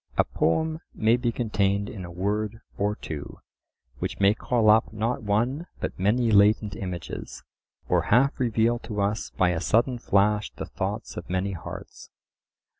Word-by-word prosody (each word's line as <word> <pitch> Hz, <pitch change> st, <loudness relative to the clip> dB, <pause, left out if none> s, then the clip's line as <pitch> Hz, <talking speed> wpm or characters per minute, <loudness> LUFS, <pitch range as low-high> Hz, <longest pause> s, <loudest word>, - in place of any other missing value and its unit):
A -, -, +6 dB
poem 160 Hz, -, 0 dB, 0.2 s
may 110 Hz, +2 st, +4 dB
be 120 Hz, -1 st, 0 dB
contained 100 Hz, -4 st, 0 dB
in 95 Hz, -4 st, -7 dB
a 85 Hz, -, -9 dB
word 105 Hz, +5 st, -2 dB
or 105 Hz, +1 st, 0 dB
two, 75 Hz, -7 st, -7 dB, 0.6 s
which -, -, -4 dB
may 100 Hz, +1 st, +5 dB
call 115 Hz, 0 st, 0 dB
up 110 Hz, +1 st, +5 dB
not 110 Hz, +3 st, -1 dB
one 120 Hz, -, 0 dB
but -, -, -4 dB
many 115 Hz, +5 st, +2 dB
latent 105 Hz, 0 st, +4 dB
images; 90 Hz, -3 st, -6 dB, 0.4 s
or -, -, +3 dB
half 130 Hz, +5 st, +4 dB
reveal 120 Hz, -1 st, +2 dB
to 105 Hz, -3 st, -6 dB
us 100 Hz, +2 st, 0 dB
by 90 Hz, -, +4 dB
a 85 Hz, -2 st, -1 dB
sudden 120 Hz, +6 st, +2 dB
flash 105 Hz, 0 st, +2 dB
the -, -, -6 dB
thoughts -, -, -4 dB
of -, -, -7 dB
many 95 Hz, +2 st, -1 dB
hearts. 85 Hz, -3 st, -9 dB
105 Hz, 160 wpm, -26 LUFS, 100-115 Hz, 0.6 s, A